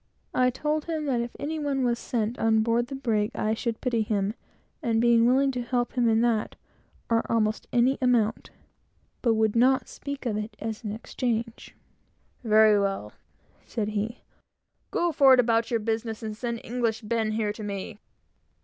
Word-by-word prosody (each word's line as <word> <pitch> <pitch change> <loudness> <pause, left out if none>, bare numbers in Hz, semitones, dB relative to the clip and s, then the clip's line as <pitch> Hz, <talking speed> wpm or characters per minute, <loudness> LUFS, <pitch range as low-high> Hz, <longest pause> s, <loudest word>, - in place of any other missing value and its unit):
I 255 0 +3
told 300 +4 -2
him 315 -2 -3
that 255 -4 +1
if 235 0 -6
any 315 +2 -3
one 280 -3 -1
was 240 -1 +1
sent 230 0 -2
on 220 -1 +3
board 235 +1 +1
the 275 - -6
brig, 220 -6 0
I 215 +1 0
should 230 0 -3
pity 240 -3 0
him, 205 -1 0 0.5
and 230 -5 +1
be 235 0 +4
willing 265 +4 +4
to 250 -1 -3
help 245 0 -1
him 245 -2 +2
to 225 0 +3
that, 230 -3 0 0.5
or 230 -1 +2
almost 215 -1 0
any 250 +3 +2
amount; 240 -4 +1 0.7
but 230 -3 +2
would 220 0 +1
not 260 +3 +3
speak 280 -1 -7
of 215 -4 -1
it 215 +1 -5
as 220 +1 -5
an 210 - -3
exchange. 230 +1 -4 0.7
"Very 215 -2 +5
well," 195 - -2 0.5
said 215 -3 -3
he. 215 +3 -3 0.7
"Go 345 0 0
forward 270 -4 +6
about 230 -1 +2
your 230 - +1
business, 225 0 -3
and 215 -1 -4
send 235 0 -4
English 230 -2 -1
Ben 220 0 -1
here 215 -1 -1
to 215 - -10
me!" 205 0 -5
230 Hz, 175 wpm, -26 LUFS, 220-250 Hz, 0.7 s, forward